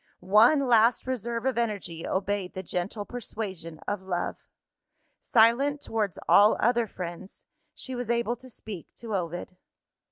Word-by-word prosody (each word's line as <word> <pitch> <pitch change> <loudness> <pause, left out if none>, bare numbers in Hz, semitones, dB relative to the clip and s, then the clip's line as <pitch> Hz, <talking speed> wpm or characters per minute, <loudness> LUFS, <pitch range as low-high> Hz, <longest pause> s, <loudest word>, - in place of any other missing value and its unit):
One 240 +8 +7
last 235 -2 +4
reserve 235 -2 -3
of 260 -3 +1
energy 200 -8 -3
obeyed 195 -1 -2
the 190 - -4
gentle 190 +4 -3
persuasion 200 -9 -6
of 205 -1 -2
love. 180 -2 -2 0.8
Silent 250 +5 +4
towards 215 -8 -2
all 210 +2 +6
other 235 -1 +2
friends, 180 0 -8 0.3
she 260 - -5
was 245 -2 -4
able 235 0 +1
to 255 +2 -14
speak 210 -6 -8
to 225 -3 -5
Ovid. 175 0 -4
220 Hz, 135 wpm, -27 LUFS, 190-235 Hz, 0.8 s, One